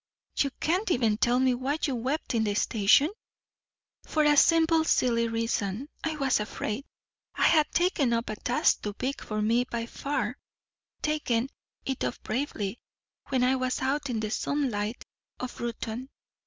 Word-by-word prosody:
"You 280 - +2
can't 365 +7 0
even 230 -9 +2
tell 240 +2 +3
me 260 -1 +3
why 265 +4 -1
you 275 - +1
wept 260 +6 -2
in 225 -2 +2
the 205 -2 0
station?" 220 - +4 0.9
"For 310 - +1
a 295 0 +5
simple 325 +1 +5
silly 235 -6 +2
reason. 230 +1 -2
I 320 -1 -1
was 275 -5 +1
afraid. 215 +4 -4 0.5
I - - 0
had 310 -2 +4
taken 335 -8 +2
up 230 0 0
a - - -3
task 245 +3 +2
too 210 - -4
big 260 +6 -3
for 215 -1 -2
me 230 +3 +3
by 235 -2 -3
far 255 -1 -3 0.6
taken 270 -5 0 0.4
it 265 -2 -2
up - - -1
bravely 220 -4 -3 0.5
when 260 -2 +2
I 255 +1 +3
was 255 0 -1
out 275 +2 -1
in 230 -3 -1
the 215 -1 -3
sunlight 240 -5 -1 0.3
of 255 0 -6
Reuton. 235 +2 -4
250 Hz, 160 wpm, -28 LUFS, 230-285 Hz, 0.9 s, a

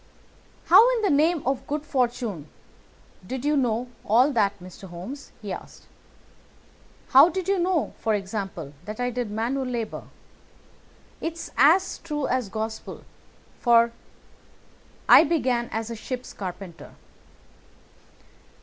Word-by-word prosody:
"How, 485 +3 +7
in 450 - -2
the 400 - +3
name 310 +2 +2
of 265 0 -1
good 300 +1 -3
fortune, 235 - -2 0.8
did 260 +3 -5
you 300 +1 +2
know 245 -3 0 0.2
all 245 +7 +4
that, 205 -6 +1
Mr. 185 +2 -11
Holmes?" 195 +12 -8
he 200 -3 -4
asked. - - -10 1.3
"How 275 +6 +8
did 370 +1 -4
you 395 -1 +2
know, 350 -3 0
for 220 -1 +1
example, 195 -7 -5
that 215 +2 -7
I 245 0 0
did 245 -2 -3
manual 235 +6 -2
labour. 235 -3 -4 1.2
It's 330 0 -5
as 325 +10 +4
true 300 -4 -3
as 250 -5 -1
gospel, 220 +1 -5 0.6
for 235 -1 +4 1.2
I - - +9
began 255 -7 0
as 225 +1 -3
a - - -4
ship's 250 +3 -6
carpenter." 180 -2 -8
245 Hz, 125 wpm, -25 LUFS, 215-295 Hz, 1.3 s, I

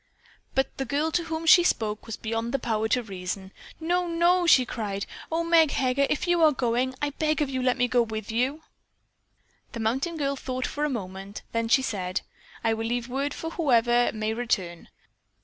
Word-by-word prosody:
But 265 0 0
the 270 - -1
girl 295 +5 0
to 340 +1 0
whom 325 0 -4
she 350 +2 +8
spoke 215 -10 -1
was 225 - -5
beyond 230 +2 -2
the - - +4
power 220 -3 -1
to 245 +2 +1
reason. 190 -1 -6 0.3
"No! 350 +2 0
No!" 345 +1 +3
she 260 -6 +6
cried. 205 -4 -4 0.3
"Oh, 330 +1 +1
Meg 335 -2 +5
Heger, 270 +1 +1
if 300 - -1
you 350 -1 +3
are 315 -1 +7
going, 255 0 0
I 290 - +1
beg 310 +2 0
of 290 -3 0
you 260 -1 -1
let 255 0 +2
me 245 0 +2
go 245 0 +3
with 220 -1 -4
you." 260 +7 -1 1.1
The 230 - -5
mountain 265 +10 -1
girl 280 -2 0
thought 255 -1 -4
for 295 +1 -2
a - - 0
moment, 195 -4 -6
then 230 0 -1
she 265 +3 +4
said: 185 -6 -2 0.4
"I 225 -1 +2
will 225 0 -2
leave 240 +1 -2
word 275 +3 -1
for 325 - -5
whoever 240 -7 +3
may 215 0 -2
return." 190 -8 -2
250 Hz, 200 wpm, -26 LUFS, 225-300 Hz, 1.1 s, she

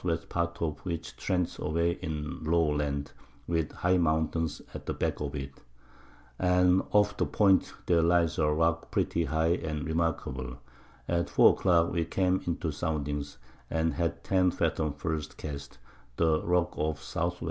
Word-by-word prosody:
W. 85 -2 +1
Part 85 0 -2
of 75 -3 -2
which 85 -3 -5
trents 90 -3 -1
away 85 +3 +1
in 75 0 -4
low 80 -1 +2
Land, 70 -1 -2 0.3
with 80 -3 -1
high 90 +1 +1
Mountains 80 -1 0
at - - -8
the - - -2
back - - -1
of 70 0 -3
it; 70 -1 -5 0.9
and 90 0 +4
off 105 0 +3
the - - +1
Point 95 -3 +3
their 85 -2 +4
lies 85 -1 +2
a 75 - +3
Rock 85 +2 +1
pretty 85 - 0
high 80 +2 +2
and 75 -3 -4
remarkable; 80 -6 -2 0.5
at 85 -1 0
4 - - +7
a - - -2
Clock 85 -3 +3
we 85 -1 +1
came 95 +2 +1
into 85 -1 -1
Soundings, 75 -2 -3 0.3
and 80 0 0
had 85 -1 -2
10 95 -1 +3
Fathom 80 -3 0
the - - -20
first 80 -2 -3
Cast; 70 -2 -7 0.4
the 80 -2 +3
Rock 90 -1 +1
off 75 -1 -1
the 80 - +1
S. 85 - -3
80 Hz, 170 wpm, -29 LUFS, 75-85 Hz, 0.9 s, 4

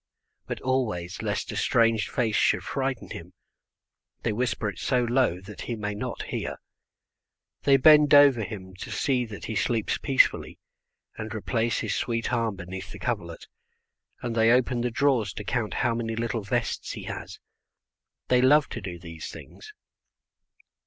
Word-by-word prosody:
but - - -4
always, 110 -10 -1
lest - - -2
a - - -6
strange 115 -2 +2
face 115 -4 0
should - - +3
frighten 135 -2 -3
him, 85 +2 -8 0.9
they 115 - 0
whisper 115 -1 -1
it 100 - -5
so 125 -1 +1
low 120 -7 +2
that 100 +2 -10
he 120 - -3
may 105 -1 -3
not 120 +4 -4
hear. - - -4 1.1
They 140 -1 +6
bend 150 +1 +7
over 140 -6 +7
him 95 -2 -7
to - - -7
see 130 -3 0
that 110 -3 -8
he 110 - -4
sleeps 110 0 0
peacefully, 135 -2 +2 0.6
and 110 +1 -5
replace 115 +2 0
his 110 -3 -2
sweet 115 +1 -1
arm 115 -3 0
beneath 95 +1 -7
the - - -8
coverlet, - - -4 0.8
and 120 -2 -2
they 115 0 +4
open 125 0 +3
the 125 - 0
drawers 120 -5 +1
to 105 - -6
count 110 0 -2
how 120 - +2
many 115 -1 -2
little 115 0 -2
vests 115 +4 -2
he - - -7
has. - - -7 0.9
They 125 -1 +4
love 145 +3 +5
to 120 - -6
do 90 -2 -6
these 85 -2 -8
things. 430 - -11
115 Hz, 160 wpm, -26 LUFS, 105-125 Hz, 1.1 s, bend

